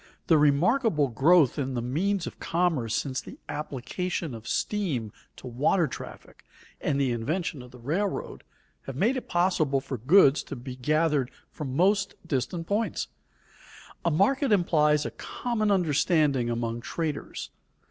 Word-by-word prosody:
The 165 - +5
remarkable 150 - +3
growth 145 +4 +4
in 135 -2 -2
the 120 - -1
means 180 +10 0
of - - -8
commerce 160 -10 0
since 130 -3 -2
the - - -11
application 155 +3 -4
of 115 0 -9
steam 145 - -1 0.2
to - - -13
water 140 +8 +2
traffic, - - -10 0.4
and 140 - 0
the 135 -3 +2
invention 145 +5 -2
of 125 - -12
the 125 - -14
railroad, 165 - -3 0.4
have 135 - -5
made 220 - +2
it 255 - -5
possible 175 -6 +2
for 130 -2 -6
goods 145 - +5
to - - -6
be 125 0 -7
gathered 150 0 +1 0.2
from 135 -4 -5
most 195 +4 +2
distant 165 +4 -2
points. 210 +5 -1 0.9
A - - +2
market 255 - +2
implies 150 -6 +3
a - - -3
common 230 -4 -2
understanding 150 -7 +2
among 115 0 -2
traders. 155 +2 -4
150 Hz, 145 wpm, -27 LUFS, 130-180 Hz, 0.9 s, The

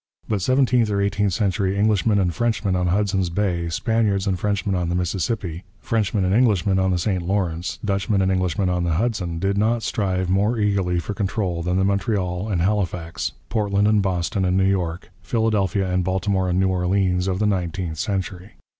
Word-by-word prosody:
But 105 -3 -1
seventeenth 125 0 +2
or 100 -1 0
eighteenth 100 0 +1
century 95 0 0
Englishmen 105 0 +2
and 90 -3 +1
Frenchmen 110 -4 0
on 90 0 0
Hudson 95 +1 +1
Bay, 90 -4 0
Spaniards 105 +1 0
and 95 -3 -1
Frenchmen 100 +1 -1
on 90 -2 -1
the 85 - -1
Mississippi, 90 0 -2 0.2
Frenchmen 110 -5 0
and 90 - +1
Englishmen 105 -5 +3
on 95 0 +2
the 90 - +1
St 90 +1 -1
Lawrence, 90 -2 -2
Dutchmen 100 +1 0
and 95 0 +2
Englishmen 95 +1 0
on 90 -1 0
the 85 -2 0
Hudson, 90 -3 -1
did 100 +3 0
not 115 +2 +1
strive 95 -4 -1
more 100 +6 +1
eagerly 100 -4 +1
for 85 +5 -3
control 95 -4 -2
than 90 +2 0
the 95 - +2
Montreal 100 -1 -1
and 90 -5 0
Halifax, 85 -9 -1 0.2
Portland 105 -2 +1
and 105 -1 +3
Boston 95 +1 -1
and 90 0 +1
New 95 - +3
York, 90 -3 -1
Philadelphia 100 -1 0
and 90 0 +1
Baltimore 95 0 0
and 90 +1 +1
New 95 0 +2
Orleans 90 0 +1
of 95 -1 0
the 105 - 0
nineteenth 90 -4 -2
century. 95 -1 -3
95 Hz, 185 wpm, -22 LUFS, 90-105 Hz, 0.2 s, Englishmen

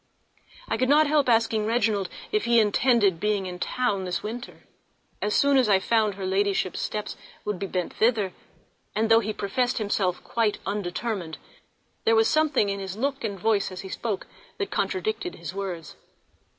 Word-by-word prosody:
I - - -1
could 255 +2 +1
not 300 +2 +6
help 290 -3 +2
asking 225 -2 +2
Reginald 215 -5 +1 0.2
if 425 0 +1
he 235 0 +5
intended 210 -3 +3
being 210 0 0
in 180 -1 -6 0.2
London 205 -7 +1
this 180 -1 -2
winter, 235 +4 -7 0.6
as 210 0 0
soon 280 -1 +4
as 250 -5 +3
I 195 - +6
found 215 +1 +1
her 195 -1 -5
ladyship's 195 -1 0
steps 210 -1 -3 0.3
would 210 -3 -2
be 195 - -3
bent 180 -2 -3
thither; 220 -5 +1 0.6
and 220 +1 +1
though 225 - +8
he 215 -1 -2
professed 245 +5 -1
himself 200 -4 0
quite 225 -3 0
undetermined, 195 -3 -3 0.7
there 225 - +4
was 225 0 +5
something 310 -9 +2
in 200 0 -2
his 190 0 -5
look 275 +2 -1
and 200 -4 -3
voice 205 -1 +1
as 185 - -6
he 190 - -8
spoke 210 -1 -3 0.3
which 405 - -3
contradicted 385 -1 -2
his - - -7
words. 185 -5 -5
210 Hz, 175 wpm, -26 LUFS, 195-235 Hz, 0.7 s, though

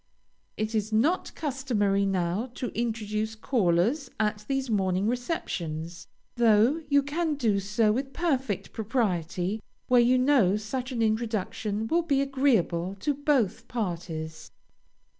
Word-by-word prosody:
It 215 +1 -2
is 215 0 -1
not 285 +12 +2
customary 230 -9 0
now 185 +4 0
to 250 - -3
introduce 220 -1 -2
callers 225 - +1
at 210 -1 -1
these 270 -1 -1
morning 190 -3 +1
receptions, 170 - -3 0.3
though 235 +6 +4
you 285 -1 +4
can 310 +2 -1
do 225 -8 +1
so 210 +2 +2
with 265 +4 -2
perfect 265 - -1
propriety 200 -4 -1 0.3
where 250 -1 +6
you 250 +2 +4
know 255 -7 +4
such 250 +5 -4
an 235 -3 0
introduction 220 -1 -1
will 335 +9 +2
be 290 -5 +1
agreeable 235 -10 +1
to 290 - +1
both 280 -8 0
parties. 165 -7 -4
220 Hz, 125 wpm, -27 LUFS, 195-265 Hz, 0.3 s, where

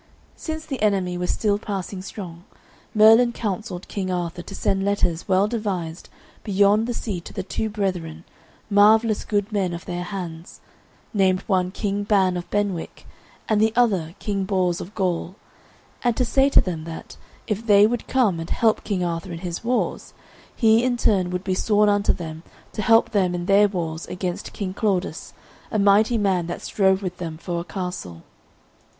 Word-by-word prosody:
Since 315 -1 -5
the 270 -7 -5
enemy 195 -4 +1
were 180 0 -2
still 205 +1 +1
passing 195 -2 -5
strong, 180 -3 -8 0.5
Merlin 225 +3 +7
counselled 205 -4 -4
King 190 -2 -3
Arthur 175 -1 -3
to 195 - -9
send 195 0 0
letters 185 -4 0
well 190 +2 +3
devised 190 -7 -4 0.3
beyond 205 +2 +3
the 245 - -2
sea 195 -6 -4
to - - -10
the 190 - -4
two 220 +3 -3
brethren, 180 -6 -3 0.4
marvellous 215 +1 +4
good 205 0 -1
men 190 -4 0
of 170 - -9
their 175 0 -4
hands, 175 -4 -7 0.5
named 190 -3 +2
one 185 -3 +1
King 205 +1 -2
Ban 195 -3 +2
of 175 -1 -5
Benwick 205 -5 -2 0.4
and 215 -1 +2
the 220 0 +4
other 195 -9 +1
King 200 -2 -2
Bors 185 -3 0
of 195 +5 -9
Gaul, 180 -2 -1 0.7
and 240 -2 +1
to 250 - +2
say 270 +3 +3
to - - +6
them 165 -4 -4
that, 165 -1 -8 0.3
if 215 +2 -3
they 205 -1 +7
would 235 +1 -1
come 220 -10 +2
and 165 - -6
help 225 -2 +2
King 195 -4 -1
Arthur 170 +2 -3
in 170 - -5
his 175 +2 -4
wars, 245 +1 -2 0.4
he 225 0 +4
in 250 -1 +1
turn 195 -6 +2
would 180 0 -3
be 190 - -1
sworn 210 +2 +3
unto 205 0 +3
them 160 -2 -6 0.3
to - - -3
help 225 +2 +4
them 185 -4 +1
in 175 0 -3
their 200 +2 +5
wars 165 -4 -4
against 180 -1 -4
King 190 -3 -4
Claudas, 195 -4 -2 0.4
a 215 - -1
mighty 210 +3 +4
man 190 -5 +1
that 175 - -5
strove 190 -1 +2
with 180 -1 -4
them 165 -3 -5
for 170 +1 -4
a - - -4
castle. 180 - -6
195 Hz, 180 wpm, -23 LUFS, 180-215 Hz, 0.7 s, Merlin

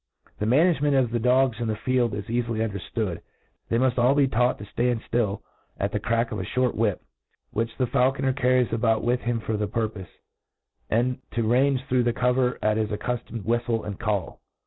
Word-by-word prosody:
The 105 - -1
manisigemcnt 145 +1 +3
of 125 -3 +2
the 120 - 0
dogs 125 0 +2
in 120 - -2
the 110 - 0
field 120 -1 0
is 105 -1 -5
cafily 115 -1 -1
underftood. 100 -2 -4 0.5
They 115 - +2
muft 125 +1 +3
be 145 - +5
ail - - +3
taught 125 +2 +2
to - - -9
ftand 120 +2 0
ftill 110 -4 0 0.4
at - - -1
the - - -1
crack 115 +1 0
of - - -3
a - - -2
(hort 125 -1 0
whip, 105 -4 0 0.5
which 115 +1 -2
the 130 - +2
faulconet 130 +1 +1
carries 125 -3 +2
about 115 -1 +1
with 120 +2 +1
him 120 -1 -1
for 110 -1 -2
the 105 0 -1
purpofe, 110 -3 -3 0.8
and 125 +3 +1
to 115 - 0
range 130 +2 +2
through 130 -2 +2
the 120 -1 +1
Cover 125 0 +1
at 110 0 +2
his 110 -1 0
accuftomed 115 +1 -4
tj^hiftle 120 0 0
and 100 -2 -6
Call. 105 -6 -2
120 Hz, 195 wpm, -25 LUFS, 110-125 Hz, 0.8 s, be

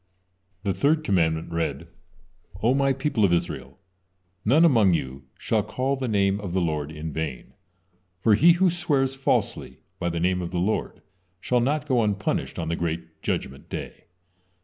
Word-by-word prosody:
The 100 -2 0
third 155 +6 +2
commandment 80 - +1
read: 85 -1 -2 0.8
"O 120 +3 +4
My 135 0 +2
people 130 -4 0
of 95 - +4
Israel, 85 0 -2 0.7
none 150 +10 +5
among 110 - +5
you 65 -2 -5
shall - - 0
call 135 +2 -1
the 130 -1 -3
name 100 -2 +2
of 95 -4 -5
the 95 - +2
Lord 75 -4 -1
in 75 0 -6
vain, 75 -5 -5 0.7
for 110 +3 +4
he 165 +11 +6
who 180 +1 +3
swears 145 -7 0
falsely 135 0 -1 0.2
by 85 - -1
the 85 0 -2
name 90 +1 +1
of 85 - -4
the 90 - -4
Lord 95 +5 -1 0.4
shall 125 +6 +1
not 145 +5 0
go 125 -4 +3
unpunished 105 -2 -1
on 80 - -3
the 85 - 0
great 80 -1 -4
Judgement 70 +1 -4
Day." - - -7
100 Hz, 170 wpm, -25 LUFS, 85-135 Hz, 0.8 s, he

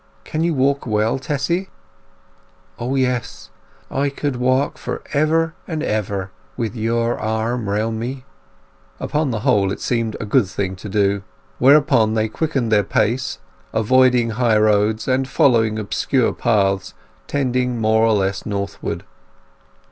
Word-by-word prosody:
Can 155 +1 -2
you 170 -2 +1
walk 140 0 +1
well, 110 +3 +1
Tessy?" 160 +7 -2 1.1
"O 125 +3 -2
yes! 125 -3 -2 0.4
I 140 +1 0
could 140 -1 -3
walk 130 +3 +1
for - - -5
ever 160 +2 +2
and 160 -3 -3
ever 100 -3 -2 0.3
with 115 -1 -3
your 115 +1 0
arm 110 0 -1
round 110 +2 -1
me!" 130 +3 -5 0.7
Upon 150 -1 -1
the 115 -3 -2
whole 100 -2 +2
it - - -4
seemed 115 -3 -1
a - - -4
good 105 0 +3
thing 95 0 -3
to 105 - -8
do. 100 0 +1 0.4
Thereupon 130 -5 +5
they 110 0 +1
quickened 135 -2 -1
their 105 -1 +4
pace, 120 +6 0 0.4
avoiding 125 +1 +3
high 115 -1 +2
roads, 105 +1 +2
and 130 0 +1
following 110 -6 +3
obscure 115 +4 0
paths 100 -3 0 0.3
tending 125 -3 0
more 110 0 +3
or 115 -1 +4
less 100 -1 0
northward. 100 -1 -4
115 Hz, 140 wpm, -20 LUFS, 105-130 Hz, 1.1 s, Thereupon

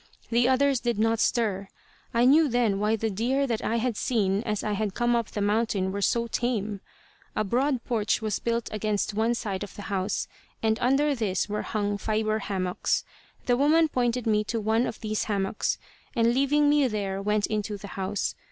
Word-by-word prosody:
The 240 +2 +3
others 270 0 +3
did 240 -3 -1
not 225 +1 +2
stir. 200 -5 +1 0.4
I 240 0 +3
knew 300 +4 +6
then 235 -6 +1
why 210 +2 +2
the 220 0 -2
deer 250 +8 +1
that 230 -4 -2
I 225 - 0
had 235 0 0
seen 205 -4 +1
as 210 -1 -1
I 210 - -1
had 205 -1 -2
come 240 0 +2
up 230 -2 0
the 205 - -4
mountain 205 -2 +1
were 200 +1 -3
so 235 +3 +2
tame. 220 -4 -2 0.5
A - - +1
broad 250 +4 0
porch 220 -3 0
was 215 -3 -2
built 235 0 -1
against 215 -1 -1
one 225 +3 +1
side 195 -4 -3
of 205 - -9
the 205 - -8
house, 190 +1 -1 0.4
and 220 0 +2
under 275 +4 +2
this 210 -8 -1
were 210 0 -2
hung 205 -1 -2
fibre 215 +1 0
hammocks. 185 -3 -1 0.4
The 245 -1 +2
woman 315 +4 +4
pointed 245 -2 0
me 210 -1 +2
to 230 +2 -2
one 220 +3 +1
of - - -6
these 215 -1 -1
hammocks, 200 -1 -1 0.4
and 235 0 +3
leaving 285 +3 +3
me 290 -2 +4
there 200 -3 -2
went 210 +1 +1
into 210 -1 -2
the 200 0 -9
house. 195 +1 -2
220 Hz, 195 wpm, -27 LUFS, 205-240 Hz, 0.5 s, knew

